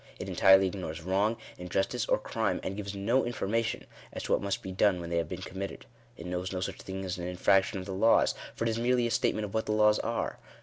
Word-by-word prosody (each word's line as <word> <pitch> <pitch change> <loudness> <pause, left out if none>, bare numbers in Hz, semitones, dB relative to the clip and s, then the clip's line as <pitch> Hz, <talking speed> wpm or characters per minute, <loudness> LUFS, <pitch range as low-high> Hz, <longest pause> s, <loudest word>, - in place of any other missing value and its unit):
It - - -6
entirely 95 0 +6
ignores 90 -4 -4
wrong, 100 +5 +1 0.2
injustice, 90 +2 -1
or - - +3
crime, - - -1
and 95 - -3
gives 100 -1 -5
no 115 +7 +2
information 115 -1 -1 0.3
as - - -6
to - - -4
what - - +3
must 100 -1 -2
be 95 - -5
done 95 0 +3
when 85 0 -6
they 85 - +1
have 85 -2 -1
been 90 0 -5
committed. 95 +1 -6 0.3
It 85 - -9
knows 90 +1 -3
no 95 - -2
such 95 - -4
thing 95 0 -5
as 90 -1 -3
an 90 - -4
infraction 95 +3 +2
of 95 - -5
the 95 - -5
laws, 110 +5 +4 0.2
for - - -3
it 115 - +1
is 110 - -2
merely 120 0 +2
a 120 - -1
statement 110 -2 +1
of 100 - -8
what 110 0 -1
the 105 - +1
laws 105 0 +4
are. - - -2
95 Hz, 250 wpm, -30 LUFS, 90-105 Hz, 0.3 s, entirely